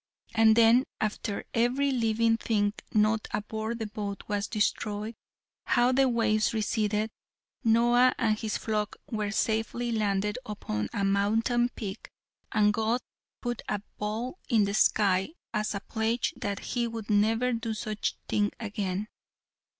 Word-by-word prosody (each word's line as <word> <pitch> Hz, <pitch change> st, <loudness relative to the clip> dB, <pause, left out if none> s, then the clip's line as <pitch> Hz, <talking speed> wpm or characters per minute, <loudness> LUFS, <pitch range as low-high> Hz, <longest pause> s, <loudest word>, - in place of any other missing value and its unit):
And 220 Hz, -1 st, +6 dB
then 235 Hz, +3 st, +6 dB
after 210 Hz, -1 st, -2 dB
every 255 Hz, +4 st, +2 dB
living 230 Hz, -2 st, +2 dB
thing 210 Hz, -3 st, 0 dB, 0.2 s
not 215 Hz, +1 st, +2 dB
aboard 220 Hz, +2 st, -3 dB
the 225 Hz, -, -3 dB
boat 205 Hz, -2 st, -5 dB
was 205 Hz, -1 st, -1 dB
destroyed, 210 Hz, 0 st, -1 dB, 0.5 s
how 245 Hz, 0 st, +3 dB
the 265 Hz, 0 st, +4 dB
waves 220 Hz, -2 st, +2 dB
receded, 215 Hz, 0 st, 0 dB, 0.5 s
Noah 240 Hz, +2 st, +4 dB
and 220 Hz, -2 st, +2 dB
his 215 Hz, 0 st, -2 dB
flock 210 Hz, -2 st, -2 dB, 0.2 s
were 215 Hz, -2 st, -1 dB
safely 225 Hz, +3 st, 0 dB
landed 210 Hz, 0 st, 0 dB
upon 105 Hz, -, -3 dB
a 200 Hz, -, -2 dB
mountain 225 Hz, +5 st, +2 dB
peak, 210 Hz, -4 st, -7 dB, 0.4 s
and 210 Hz, -1 st, +4 dB
God 225 Hz, +3 st, +1 dB, 0.4 s
put 240 Hz, -1 st, -2 dB
a 205 Hz, -1 st, -1 dB, 0.2 s
bow 225 Hz, -, -3 dB
into 225 Hz, -5 st, +4 dB
the -, -, -4 dB
sky 200 Hz, +3 st, +3 dB, 0.2 s
as 215 Hz, -1 st, -1 dB
a -, -, -1 dB
pledge 225 Hz, +3 st, -1 dB
that 200 Hz, -1 st, -3 dB, 0.2 s
he 240 Hz, -1 st, +1 dB
would 225 Hz, -2 st, -5 dB
never 225 Hz, +4 st, +3 dB
do 225 Hz, -1 st, -2 dB
such 215 Hz, 0 st, -2 dB
a -, -, -33 dB
thing 205 Hz, -1 st, +1 dB
again. 205 Hz, -2 st, -3 dB
220 Hz, 140 wpm, -28 LUFS, 210-230 Hz, 0.5 s, And